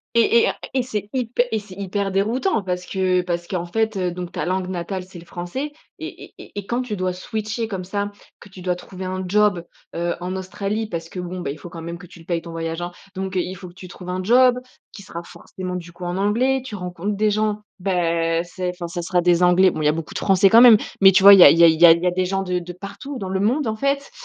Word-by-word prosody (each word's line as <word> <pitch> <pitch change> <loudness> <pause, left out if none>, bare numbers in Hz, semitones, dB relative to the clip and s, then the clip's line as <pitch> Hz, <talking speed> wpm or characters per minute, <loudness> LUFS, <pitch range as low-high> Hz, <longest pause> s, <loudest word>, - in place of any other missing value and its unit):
Et 230 0 +5
et - - +3
un - - -2 0.2
et 260 -2 +1
c'est 210 -4 -4
hyp 250 -3 -3
et 220 - +1
c'est 200 -2 -12
hyper 200 0 -2
déroutant 225 - 0
parce 180 -1 -3
que 185 -1 +1
parce 175 -1 -3
qu'en 175 -2 -3
fait, 220 +4 -1
heu, 180 -1 -1
donc 180 0 -6
ta - - -3
langue 185 0 -1
natale, 185 +1 -4
c'est 180 -1 -12
le - - -12
français 180 +13 -5 0.3
et - - -8
et - - -21
et - - -13
et 200 - -8
quand 240 +4 -1
tu 215 -5 -4
dois 185 0 -1
switcher 215 +4 -4
comme 185 -3 -5
ça, 205 +1 -3 0.3
que 205 - -14
tu 190 -1 -12
dois 180 0 -1
trouver 185 +1 -9
un 185 0 -3
job, 200 -2 +2 0.3
heu, 170 0 -1
en 180 +1 -4
Australie 200 +3 -3
parce 165 -3 -5
que, 180 - -8
bon, 180 +1 -6
bah, 140 - -3
il 150 - -8
faut 175 - -10
quand 165 -2 -9
même 170 +1 -6
que 180 0 -13
tu 170 - -15
le 165 - -15
payes 170 -1 -1
ton 170 - -10
voyage, 165 0 -4
hein, 175 - -4 0.2
donc 190 0 -3
heu, - - +3
il 185 +2 -5
faut 180 -1 -10
que - - -17
tu 185 0 -11
trouves 180 +1 -10
un 185 +1 -2
job 250 +3 +5 0.3
qui 200 - -11
sera 170 -2 -8
forcément, 185 +1 -8
du 170 -1 -10
coup, 180 - -11
en 175 +1 -3
anglais, 250 +7 +1
tu 225 - -6
rencontres 180 +2 -4
des 210 +1 +2
gens, 215 0 0 0.2
bah, 170 -3 0
c'est 180 +1 -4
enfin, 175 -1 -7
ça 175 0 -4
sera 175 +1 +1
des 175 0 +3
anglais. 180 +1 +5
Bon, - - -5
il - - -1
y - - +5
a 150 - +3
beaucoup 165 -1 -6
de - - -3
français 195 0 +4
quand 230 +3 +7
même 240 -3 +10 0.3
mais 195 0 +9
tu 190 - +4
vois, 200 0 +11
il 195 - +8
y - - +11
a - - +10
il 165 - +4
y 170 - +6
a 170 - +10
il 160 0 +3
y - - +10
a 165 - +10
il 170 - -3
y 180 - +2
a - - +2
des 185 +1 0
gens 195 +1 -1
de 180 -1 -1
de 175 0 -8
partout 200 +9 -8
dans 190 -4 -5
le 190 - -1
monde, 250 +9 +1
en 220 - -1
fait, 280 +2 -1
185 Hz, 290 wpm, -21 LUFS, 175-205 Hz, 0.3 s, vois